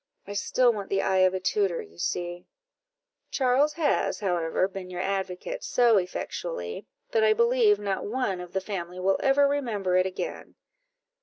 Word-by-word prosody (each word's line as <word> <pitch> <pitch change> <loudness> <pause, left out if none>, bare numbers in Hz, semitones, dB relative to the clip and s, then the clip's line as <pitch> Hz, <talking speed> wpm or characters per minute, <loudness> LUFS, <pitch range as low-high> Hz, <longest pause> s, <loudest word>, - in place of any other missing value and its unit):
I 200 - -7
still 240 +4 +2
want 205 -2 -6
the 195 0 +1
eye 190 0 +2
of 185 0 +4
a - - -1
tutor, 195 -2 0
you 85 +1 -11
see." 175 - -3 0.8
"Charles 270 +3 +2
has, 325 -3 0
however, 180 -3 0
been 190 -1 -8
your 180 -1 -6
advocate 195 - -3
so 240 -3 +4
effectually, 460 - -5 0.2
that 450 -1 +2
I 440 0 +5
believe 470 -2 +4
not 200 -1 -3
one 210 -5 -1
of 180 -1 -10
the 190 - 0
family 180 -3 -5
will 190 +1 +1
ever 280 +1 +4
remember 225 -10 -1
it 185 0 +3
again." 190 - -6
195 Hz, 165 wpm, -27 LUFS, 185-270 Hz, 0.8 s, I